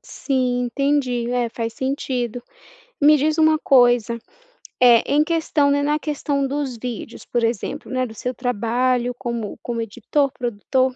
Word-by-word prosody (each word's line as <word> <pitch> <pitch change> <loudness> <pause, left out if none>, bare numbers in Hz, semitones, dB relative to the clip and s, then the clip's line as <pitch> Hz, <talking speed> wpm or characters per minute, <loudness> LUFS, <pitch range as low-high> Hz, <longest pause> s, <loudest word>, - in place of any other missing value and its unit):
Sim, 250 -2 -1
entendi. 250 -2 0
É, 245 -1 0
faz 230 0 -4
sentido. 250 -3 -3 0.6
Me 300 +1 +7
diz 310 +3 +1
uma 315 -1 +4
coisa, 245 -4 +4 0.6
eh, 240 -2 +7
em 295 +2 +3
questão, 315 -3 +1
né 285 0 +2
na 295 +1 +1
questão 290 -2 -1
dos 275 -3 -3
vídeos, 235 0 -7
por 240 -1 -1
exemplo, 230 -3 -2
né, 255 0 0
do 225 - -9
seu 250 +3 -4
trabalho 245 +1 0
como 235 -4 -4
como 235 -1 -3
editor, 245 +6 -1
produtor, 255 +2 -1
250 Hz, 150 wpm, -21 LUFS, 235-280 Hz, 0.6 s, Me